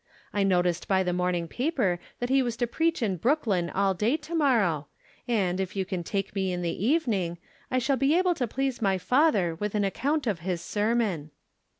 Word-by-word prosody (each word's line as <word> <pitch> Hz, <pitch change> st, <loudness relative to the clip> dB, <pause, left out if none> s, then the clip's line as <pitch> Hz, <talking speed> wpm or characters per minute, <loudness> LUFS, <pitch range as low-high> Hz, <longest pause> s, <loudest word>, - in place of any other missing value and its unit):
I 205 Hz, -, +1 dB
no 185 Hz, -2 st, +3 dB
ticed 175 Hz, -1 st, -1 dB
by 190 Hz, -1 st, +3 dB
the 180 Hz, -1 st, -1 dB
morning 180 Hz, -1 st, 0 dB
paper 245 Hz, -, 0 dB, 0.2 s
that 245 Hz, -, -2 dB
he 270 Hz, +1 st, +4 dB
was 240 Hz, -3 st, -2 dB
to 240 Hz, -, +1 dB
preach 325 Hz, +3 st, 0 dB
in 195 Hz, -4 st, 0 dB
Brooklyn 205 Hz, -, +1 dB
all 195 Hz, +1 st, +1 dB
day 220 Hz, -, +1 dB
to 310 Hz, +2 st, -10 dB
morrow, 215 Hz, -, +2 dB, 0.4 s
and, 190 Hz, -6 st, +1 dB
if 190 Hz, 0 st, -3 dB
you 190 Hz, -1 st, -1 dB
can 185 Hz, -2 st, -3 dB
take 195 Hz, +2 st, -3 dB
me 190 Hz, -2 st, -1 dB
in 180 Hz, 0 st, -3 dB
the 170 Hz, +4 st, -2 dB
evening, 220 Hz, -, +1 dB, 0.3 s
I 255 Hz, -, 0 dB
shall 265 Hz, +2 st, +1 dB
be 275 Hz, +6 st, +3 dB
able 365 Hz, -1 st, +3 dB
to 260 Hz, -7 st, -2 dB
please 265 Hz, +1 st, -2 dB
my 195 Hz, -3 st, +2 dB
father 205 Hz, -, +2 dB
with 210 Hz, +5 st, -4 dB
an 205 Hz, -, +2 dB
account 280 Hz, +10 st, 0 dB
of 205 Hz, -7 st, -1 dB
his 175 Hz, 0 st, -2 dB
sermon." 205 Hz, -5 st, -1 dB
205 Hz, 210 wpm, -27 LUFS, 180-260 Hz, 0.4 s, he